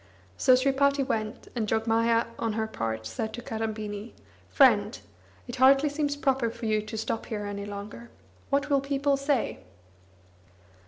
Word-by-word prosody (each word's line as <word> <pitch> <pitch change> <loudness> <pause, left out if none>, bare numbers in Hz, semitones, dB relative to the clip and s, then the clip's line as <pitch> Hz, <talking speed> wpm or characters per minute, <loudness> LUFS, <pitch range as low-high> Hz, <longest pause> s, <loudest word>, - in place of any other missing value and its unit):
So 255 - +5
Sripati 275 +2 +2
went, 220 -4 -3
and 225 -3 -1
Jogmaya 230 +1 +2
on 225 -2 -1
her 220 0 -1
part 110 - -4
said 165 - -4
to 240 - -7
Kadambini 220 -2 -4 0.4
"Friend, - - +4 0.5
it 245 +1 -6
hardly 270 +3 +5
seems 290 0 -1
proper 270 -4 +1
for 230 +1 -8
you 215 -1 +1
to 215 +1 -7
stop 225 +1 -3
here 210 -2 -4
any 200 0 -5
longer. 205 +3 -8 0.4
What 280 +1 +1
will 275 -1 +4
people 280 0 +1
say?" 275 -2 -1
230 Hz, 150 wpm, -27 LUFS, 215-275 Hz, 0.5 s, So